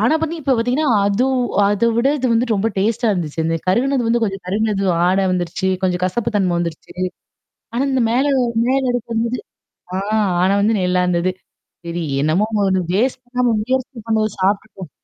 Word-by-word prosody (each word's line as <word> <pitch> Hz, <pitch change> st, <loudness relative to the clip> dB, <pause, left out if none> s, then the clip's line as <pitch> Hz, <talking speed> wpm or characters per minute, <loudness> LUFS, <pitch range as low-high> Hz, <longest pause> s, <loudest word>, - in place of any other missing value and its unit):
ஆனா 235 Hz, +9 st, +3 dB, 0.3 s
இப்ப 270 Hz, -2 st, +1 dB
பாத்தீங்கன்னா 255 Hz, +6 st, +1 dB, 0.2 s
அது 210 Hz, +6 st, +1 dB, 0.4 s
அதைவிட 230 Hz, +4 st, +2 dB
இது 235 Hz, -2 st, +1 dB
ரொம்ப 225 Hz, +3 st, 0 dB
டேஸ்ட்டா 225 Hz, +4 st, +1 dB
இருந்துச்சு. 160 Hz, -2 st, -3 dB, 0.3 s
கருகினது 245 Hz, +4 st, +1 dB
வந்து 235 Hz, 0 st, +1 dB, 0.3 s
கருகினது 205 Hz, 0 st, 0 dB
வாட 180 Hz, +3 st, +2 dB
வந்துருச்சு. 180 Hz, +2 st, -1 dB
கொஞ்சம் 180 Hz, -1 st, 0 dB
கசப்புத்தன்மை 195 Hz, -2 st, 0 dB
வந்துருச்சு. 170 Hz, -2 st, -5 dB, 0.8 s
ஆனா 250 Hz, -, +1 dB
இந்த 260 Hz, -2 st, +2 dB
மேல 260 Hz, +3 st, +2 dB, 0.4 s
மேல 270 Hz, +1 st, +2 dB
அடுக்கு 235 Hz, -1 st, -3 dB
வந்தது 230 Hz, +2 st, -1 dB, 1.1 s
ஆனா 195 Hz, +1 st, +3 dB
வந்து 220 Hz, +2 st, +2 dB
நல்லா 180 Hz, 0 st, +1 dB
இருந்தது. 180 Hz, +1 st, +1 dB, 0.5 s
சரி 170 Hz, 0 st, -3 dB, 0.2 s
என்னமோ 160 Hz, +8 st, +2 dB, 0.5 s
வேஸ்ட் 255 Hz, +5 st, +1 dB
பண்ணாம 245 Hz, -1 st, 0 dB
முயற்சி 255 Hz, +1 st, -2 dB
பண்ணது, 220 Hz, -1 st, +1 dB
சாப்பிட்டுட்டு 195 Hz, -3 st, -1 dB
220 Hz, 135 wpm, -19 LUFS, 185-245 Hz, 1.1 s, ஆனா